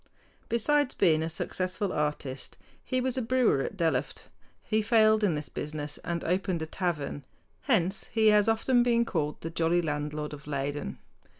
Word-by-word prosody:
Besides 280 +4 +2
being 160 -5 +3
a 160 - -2
successful 185 +3 -2
artist, 150 -3 -3 0.3
he 255 - -1
was 260 0 -1
a - - -1
brewer 235 - +2
at 195 - -4
Delft. 155 -6 -1 0.3
He 215 0 +1
failed 215 -1 +4
in 180 -6 +2
this 150 0 -3
business 150 -1 -5
and 170 -1 -3
opened 180 -1 0
a - - -2
tavern. 160 -4 -3 0.4
Hence 195 - +1
he 220 -1 +4
has 210 0 +4
often 240 +3 +3
been 235 -1 +3
called 150 -7 -2
"the 165 - -5
jolly 165 +1 +2
landlord 150 -1 -3
of 145 0 -10
Leyden." 140 - -3
175 Hz, 165 wpm, -29 LUFS, 150-220 Hz, 0.4 s, failed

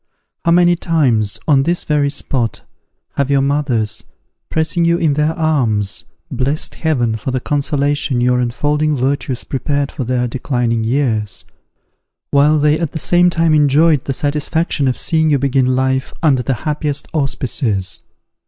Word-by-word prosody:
How - - +2
many 175 0 +4
times, 130 - 0
on 140 -4 +4
this 170 +5 0
very 145 -2 +1
spot, 125 -5 -2 0.6
have 140 -1 0
your 140 -1 +2
mothers, 135 -7 -1 0.5
pressing 160 +2 0
you 170 0 +3
in 160 -4 +1
their 150 +2 +1
arms, 120 - 0 0.3
blessed 135 +4 -1
Heaven 120 -9 0
for 110 - -5
the 130 0 -1
consolation 145 -1 -1
your 125 0 +2
unfolding 150 +5 0
virtues 135 -1 -1
prepared 140 +1 -2
for 130 - -4
their 125 0 -1
declining 120 -2 -1
years, 110 - -1 0.9
while 145 +2 +4
they 150 +1 +2
at 165 -4 -3
the - - -3
same 175 +3 +3
time 165 -2 +1
enjoyed 150 0 +3
the 135 - -2
satisfaction 145 +1 -1
of 130 - 0
seeing 160 -1 +1
you 145 - +3
begin 130 -1 +1
life 130 0 -1
under 140 -5 +3
the 125 +2 -1
happiest 150 -1 -2
auspices! 125 - -1
140 Hz, 150 wpm, -16 LUFS, 125-155 Hz, 0.9 s, many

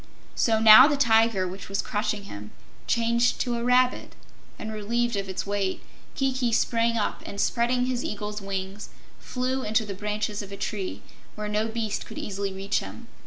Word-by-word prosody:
So 225 -2 +2
now 220 +4 +10
the 295 -2 +1
tiger 225 -6 +3
which 190 +3 -8
was 200 - -1
crushing 210 -1 -2
him 105 - -9 0.4
changed 235 +1 +2
to 245 - -1
a 235 - -3
rabbit, 250 +1 +2 0.4
and 220 0 -6
relieved 235 +2 -1
of 195 -1 -3
its 190 - -3
weight, 200 -1 -2 0.3
Kiki 260 -3 0
sprang 230 0 +1
up 210 - -1
and, 200 - -7
spreading 245 +3 +1
his 250 -1 -2
eagle's 210 0 -4
wings, 195 +1 -5 0.3
flew 255 +1 -2
into 220 -1 +1
the 200 - -5
branches 210 +1 -3
of 200 -1 -10
a 200 - -7
tree, 195 -3 -4 0.3
where 210 0 -4
no 210 +1 0
beast 225 -2 -3
could - - -10
easily 200 -1 -3
reach 195 +2 -1
him. 95 +3 -10
215 Hz, 175 wpm, -26 LUFS, 200-235 Hz, 0.4 s, now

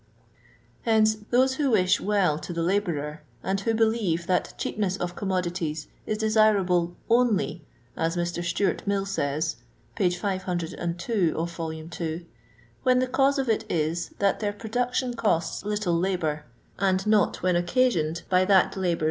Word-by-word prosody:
Hence, 220 -1 +4 0.2
those 260 +2 +3
who 285 -3 +1
wish 190 -4 +3
well 195 -7 +2
to 175 - -7
the 165 0 -1
labourer, 165 -5 -1 0.2
and 195 +1 0
who 225 +3 0
believe 220 -7 +1
that 180 0 0
cheap - - -4
ness 195 -2 0
of 180 -1 -4
commodities 175 -5 -2 0.2
is 215 - -1
desirable 205 -6 +3
"only," 230 -8 +2 0.3
as 165 +2 -1
Mr. 175 0 -2
Stewart 175 +2 0
Mill 200 -1 +1
says 155 -3 -1 0.4
(p. 190 -5 +2
502, 175 0 -1
vol. 165 -1 -5
ii.), 160 +1 -5 0.5
"when 255 -1 +3
the 255 - +3
cause 275 +2 +2
of 270 -1 -1
it 220 -1 +1
is, 165 +1 -1
that 200 -1 +1
their 205 -1 -1
production 245 +4 -1
costs 205 -9 0
little 205 -5 0
hibour, 160 -6 -1 0.3
and 190 0 +1
not 215 -4 +2
when 185 -1 +2
occasioned 175 -4 +1
by 185 0 +3
that 190 -1 +4
labour's 180 -3 +1
No. - - -11
185 Hz, 150 wpm, -26 LUFS, 170-215 Hz, 0.5 s, Hence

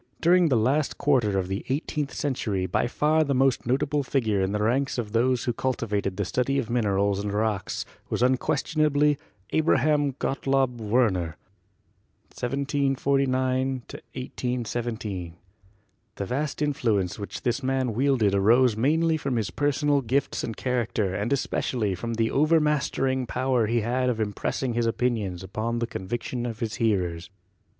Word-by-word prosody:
During 175 0 +4
the 130 - +3
last 135 +7 +1
quarter 120 -9 +2
of 95 -1 -1
the 95 +1 -3
eighteenth 145 +1 -2
century 110 -9 -1
by 95 +6 0
far 155 +5 +2
the 140 -2 0
most 130 -2 +2
notable 145 +3 +1
figure 115 -7 0
in 95 +1 0
the 105 0 0
ranks 130 +5 +1
of 110 -4 -3
those 120 +2 +2
who 120 - 0
cultivated 105 -7 -2
the 100 - -1
study 125 +7 0
of 120 -4 -2
minerals 100 -3 +1
and 105 - -2
rocks 105 -2 -1 0.2
was - - 0
unquestionably 145 +3 +2 0.3
Abraham 150 -2 +2
Gottlob 135 -2 0
Werner 105 -7 +1 1.0
(1749 135 -1 0 0.2
1817). 120 -8 -4 0.8
The 100 - -3
vast 145 +7 -2
influence 110 -11 0
which 100 - -6
this 125 +2 0
man 130 -2 0
wielded 125 -4 +2
arose 115 +4 +4
mainly 160 +7 +2
from 140 -4 -2
his 110 -3 -1
personal 145 0 +1
gifts 130 +3 -1
and 115 - -4
character 115 -6 -1
and 105 +5 -2
especially 120 -5 0
from 115 +6 -4
the 115 0 +1
overmastering 145 -4 +2
power 125 -2 +1
he 115 +1 +1
had 125 +3 0
of 115 -3 -1
im 105 -2 -1
pressing 125 +4 -2
his 120 0 +1
opinions 110 -7 -1
upon 110 +5 -3
the 120 - 0
convictions 120 +4 -4
of 115 -2 -5
his 110 -2 -3
hearers. 90 -6 0
125 Hz, 145 wpm, -26 LUFS, 105-135 Hz, 1.0 s, During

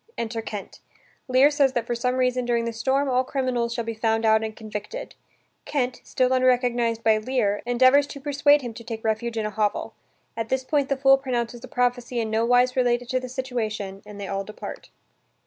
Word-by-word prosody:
Enter 230 0 -3
Kent. 210 -3 -7 0.5
Lear 260 +3 +5
says 280 -3 +2
that 240 -3 -1
for 240 - -2
some 250 +2 0
reason 255 -1 +1
during 235 -1 0
this 230 -1 -5
storm 275 +3 +1
all 255 -1 +2
criminals 255 -3 -1
shall 235 0 -2
be 230 0 -4
found 225 0 0
out 220 0 +4
and 220 -1 -4
convicted. 215 - -7 0.5
Kent, 255 -3 -2
still 255 0 +1
unrecognized 245 -3 +2
by 220 -1 +4
Lear, 215 -3 0
endeavors 255 +4 +5
to 280 - -8
persuade 290 0 +3
him 240 -2 -5
to 235 - -10
take 225 -1 -6
refuge 225 +1 -1
in 220 - -1
a 215 - -2
hovel. 210 -1 -1 0.4
At 225 0 -4
this 260 0 0
point 285 0 0
the 275 - +1
fool 270 0 +5
pronounces 240 -2 -3
a - - -7
prophecy 245 -1 -1
in 220 -1 -2
no 220 +1 +1
wise 245 +1 +4
related 245 -1 +1
to 255 - +1
the 255 0 -7
situation 220 -6 -4
and 210 -1 -11
they 200 - -5
all 195 0 -2
depart. 210 +2 -9
245 Hz, 205 wpm, -24 LUFS, 225-255 Hz, 0.5 s, Lear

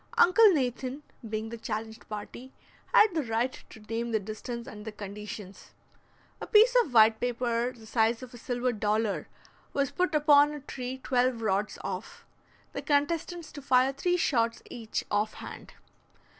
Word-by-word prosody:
Uncle 430 +5 +7
Nathan, 260 -1 -2 0.3
being 220 +1 -3
the 235 0 -7
challenged 220 0 -5
party, 220 +5 -7 0.4
had 425 -3 +6
the 320 - +1
right 235 0 -2
to - - -13
name 230 +2 -3
the 220 - +2
distance 225 +3 -6
and 210 0 -9
the 220 - -6
conditions. 205 -1 -9 0.7
A - - -5
piece 450 +4 +6
of 295 - -9
white 220 -1 +6
paper 240 0 0
the 230 -3 -15
size 225 +2 +1
of 250 - -10
a - - -9
silver 245 +1 -1
dollar 215 0 0 0.5
was 280 -1 0
put 360 -4 0
upon 295 -1 +5
a 295 - -6
tree 260 -2 -6
twelve 250 -2 +1
rods 205 0 0
off, - - -6 0.5
the - - -4
contestants 330 +3 -1
to 285 - -9
fire 265 -1 +3
three 355 +6 0
shots 230 -8 +1
each 225 -2 -4
off 210 +1 0
hand. - - -10
240 Hz, 160 wpm, -29 LUFS, 220-280 Hz, 0.7 s, Uncle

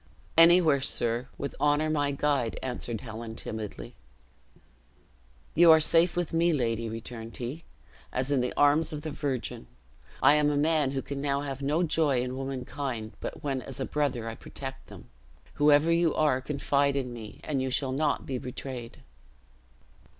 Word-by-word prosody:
"Anywhere, 165 -4 +6
sir, 120 -2 -1
with 140 - -4
honor 150 +1 +2
my 145 -2 +1
guide," 140 -4 0
answered 120 -3 -4
Helen, 115 -1 -7
timidly. 105 - -6 1.6
"You 170 +1 +6
are 160 - +8
safe 165 +2 +4
with 175 -3 -1
me, 170 +1 +3
lady," 115 -4 -1
returned 115 0 -7
he, 130 +7 -6 0.5
"as 130 +2 -1
in 135 -3 +3
the 125 - -1
arms 145 +3 +4
of 150 -1 -6
the 155 - -4
Virgin. 135 - -4 0.6
I - - +8
am 150 -1 +3
a 145 - 0
man 150 -1 +2
who 135 0 -3
can 140 -1 -5
now 140 -1 0
have 140 -1 -5
no 150 +5 +1
joy 150 -6 +2
in 125 0 -4
womankind, 130 -3 -4
but - - -6
when 135 -3 -1
as - - -8
a 135 - -1
brother 140 -6 -1
I 115 - -3
protect 135 +3 -8
them. - - -12 0.5
Whoever 150 +2 +5
you 170 -1 +2
are, 145 -4 +2
confide 140 0 +1
in 130 -3 -2
me, 110 -3 -9
and 140 -4 -1
you 130 - -1
shall 130 +1 0
not 145 +2 0
be 130 -2 -3
betrayed." 125 - -7
140 Hz, 165 wpm, -28 LUFS, 125-150 Hz, 1.6 s, are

